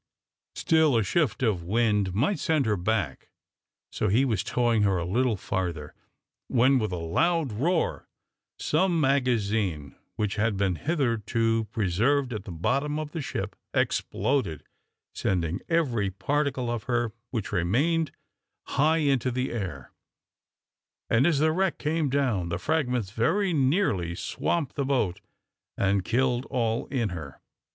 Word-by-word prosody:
Still 160 -6 +3
a 110 - +2
shift 140 - 0
of 105 -7 +1
wind 105 0 +1
might 145 - +1
send 155 -5 +1
her 105 -1 +2
back, 90 -6 -2 0.6
so 105 - -1
he 115 +7 +3
was 110 -7 0
towing 120 -2 +1
her 100 -2 +2
a 85 - -2
little 115 +4 +1
farther, 85 -6 -3 0.5
when, 130 +2 +4
with 110 -4 -2
a - - -2
loud 155 - +1
roar, 160 - 0 0.5
some 170 +2 +1
magazine, 110 - 0 0.2
which 105 0 -2
had 105 -1 +1
been 95 -2 +1
hitherto 115 -6 0
preserved 115 +7 +1
at 105 -2 -5
the 95 - -7
bottom 135 - 0
of 155 -1 -4
the 165 - -4
ship, 100 -6 -4 0.2
exploded, 105 - 0 0.5
sending 90 -1 -1
every 125 - +1
particle 130 +5 -1
of 120 -3 -4
her 120 -2 0 0.2
which 110 -5 -3
remained 135 - +1 0.6
high 155 +3 +3
into 135 -5 +1
the 125 +1 -2
air, 90 - -5 1.2
and 120 +7 +4
as 165 -4 +2
the 155 +2 +3
wreck 185 +2 0
came 155 -1 0
down, 125 -11 0
the 85 - -1
fragments 125 - -1
very 185 - +1
nearly 130 - +1
swamped 150 - -2
the 140 - 0
boat 125 -10 0 0.6
and 100 -1 +2
killed 125 +3 0
all 115 -3 -1
in 120 -6 -1
her. 75 -7 -7
120 Hz, 140 wpm, -27 LUFS, 100-140 Hz, 1.2 s, when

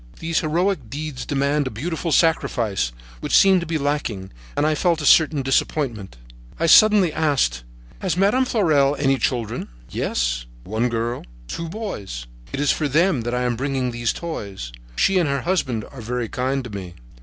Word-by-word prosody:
These 165 0 0
heroic 165 - 0
deeds 145 0 -5
demand 140 0 +1
a - - -1
beautiful 160 +8 -3
sacrifice, 115 - +1 0.3
which - - +2
seemed 190 -2 +5
to 170 - -5
be 160 0 0
lacking, 140 -10 -2 0.3
and - - +2
I 155 - +3
felt 170 +1 +1
a 150 - -3
certain 155 -3 +5
disappointment. 125 - -1 0.4
I - - +1
suddenly 200 -1 +6
asked: 135 - +1 0.4
"Has 185 -2 -1
Madame 210 +7 +3
de - - -7
Fleurel 150 - +3
any 135 -2 +2
children?" 120 -4 -2 0.2
"Yes, - - -1 0.2
one 110 +5 -1
girl 115 +1 -2
and - - -15 0.2
two 165 - -5
boys. 105 - -6 0.3
It - - -4
is 145 -1 +3
for 150 - 0
them 160 0 +2
that 120 +1 -2
I 125 - 0
am 125 -1 0
bringing 130 0 -1
these 120 -1 -1
toys. 100 - -6 0.2
She 190 - +3
and 165 -5 +1
her 140 -1 0
husband 130 - -1
are 135 - -9
very 120 0 -3
kind 130 +1 -1
to 125 - -8
me." 95 -4 -7
140 Hz, 180 wpm, -22 LUFS, 115-165 Hz, 0.4 s, suddenly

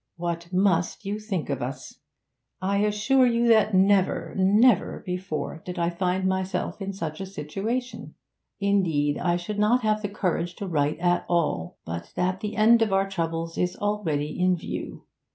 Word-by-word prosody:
'What 170 0 -4
must 185 0 +1
you 205 +2 -2
think 195 -9 -3
of 135 - -2
us! 130 +3 -6 0.6
I 195 +2 0
assure 210 +6 +3
you 235 0 +2
that 220 -3 +4
never, 190 0 +3
never 205 +3 +3
before 180 -3 -4
did 180 0 -6
I 170 0 +1
find 185 +1 0
myself 190 +2 -2
in 195 0 -3
such 165 -4 -5
a - - -3
situation. 200 - -4 0.4
Indeed, 170 -8 +1
I 175 -1 +1
should 190 +4 -4
not 230 +4 +3
have 215 0 +1
the 205 - -3
courage 175 -3 -2
to 200 - -5
write 150 -3 0
at 175 +1 +1
all, 155 - 0
but 85 +1 -6
that 185 +1 0
the 210 0 -4
end 230 +2 +5
of 220 -3 +2
our 195 0 +2
troubles 165 -3 -3
is 180 0 0
already 165 -8 -2
in 180 0 +3
view. - - -6
185 Hz, 170 wpm, -25 LUFS, 170-205 Hz, 0.6 s, end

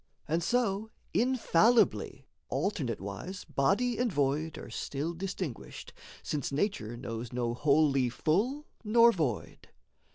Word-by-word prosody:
And 165 +2 +1
so, 220 +1 0 0.2
infallibly, 235 -2 +3 0.2
alternate 145 - -1
wise 100 - -6
Body 195 - +1
and 245 -2 +1
void 145 +1 0
are - - -9
still 145 +5 -3
distinguished, 180 - -6 0.3
Since 145 -3 -2
nature 140 - -1
knows 115 -1 -5
no 120 -1 -1
wholly 140 -1 +3
full 220 - 0 0.2
nor 230 +2 +6
void. 150 - -3
160 Hz, 110 wpm, -30 LUFS, 135-215 Hz, 0.3 s, nor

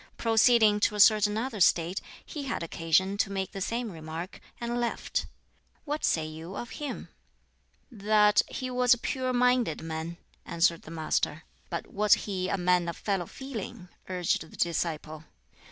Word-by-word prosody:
Proceeding 225 -2 +4
to 210 - +2
a - - -4
certain 210 0 +5
other 230 -2 -3
State, 175 0 +3 0.2
he 295 -4 -6
had 240 -9 -3
occasion 170 +4 +1
to 200 - +1
make 190 -1 -3
the 195 - -6
same 230 +2 -2
remark, 160 +2 -7 0.2
and 240 0 -2
left. 235 - -2 0.6
What 300 0 -3
say 160 -2 +2
you 160 +4 -8
of 240 +2 -6
him?" 290 -2 -5 0.8
"That 210 -1 +4
he 255 -1 -4
was 250 0 +4
a - - -11
pure 255 +1 -2
minded 250 -7 +2
man," 160 +1 -5 0.3
answered 170 0 +1
the - - -12
Master. 160 -1 -1 0.3
"But 170 - -4
was 210 0 +3
he 185 -2 -2
a - - 0
man 180 -1 +2
of 170 - -6
fellow 195 -5 -2
feeling?" 235 -7 -7 0.2
urged 180 -2 0
the - - -14
disciple. 160 -2 -2
195 Hz, 160 wpm, -28 LUFS, 170-235 Hz, 0.8 s, certain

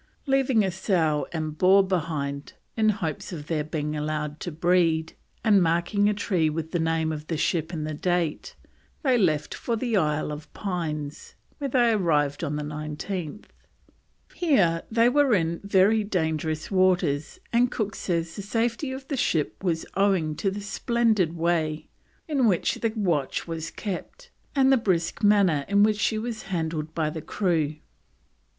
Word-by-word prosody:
Leaving 270 -5 +3
a 190 - 0
sow 170 -5 0
and 155 -2 -4
boar 190 +2 +6
behind, 150 -6 -3 0.2
in 220 -1 +3
hopes 185 -8 -3
of 155 -5 -6
their 155 -1 -1
being 150 0 -3
allowed 150 0 -3
to 175 - -5
breed, 165 -1 +2 0.3
and 210 -4 +5
marking 175 +5 +2
a - - +2
tree 180 -6 +1
with 160 +1 -4
the 175 - 0
name 160 0 0
of 155 0 -6
the 165 - -2
ship 160 +1 0
and 155 -3 -3
the 155 - -3
date, 175 0 -1 0.5
they 260 -3 +3
left 160 -10 +1
for 235 - -2
the 230 0 -1
Isle 150 -4 +1
of 150 +1 -8
Pines, 155 -7 -4 0.2
where 280 -1 -2
they 240 -2 +3
arrived 150 -8 +1
on 150 -2 -2
the 150 - -3
19th. 155 +5 -5 0.9
Here 195 - +2
they 230 +1 +4
were 275 -2 +4
in 165 -2 0
very 200 +2 +3
dangerous 160 -5 -2
waters, 180 -6 +1
and 240 +1 +4
Cook 210 -4 -2
says 165 -2 -2
the - - -5
safety 230 +6 -1
of 265 0 -7
the 285 - -2
ship 160 - -1
was 165 -3 0
owing 190 -6 +1
to 195 - 0
the 200 +2 -5
splendid 215 -4 +1
way 160 -2 0 0.4
in 275 -6 +2
which 185 -5 +2
the 230 - +1
watch 170 -12 -1
was 165 -1 -4
kept, 350 - -7 0.2
and 270 -1 +5
the - - +5
brisk 185 -5 0
manner 200 -8 +4
in 200 +1 +4
which 210 0 +2
she 220 - +1
was 225 0 -4
handled 160 -3 -3
by 155 -2 0
the 160 - -5
crew. 160 -5 0
175 Hz, 165 wpm, -26 LUFS, 155-210 Hz, 0.9 s, boar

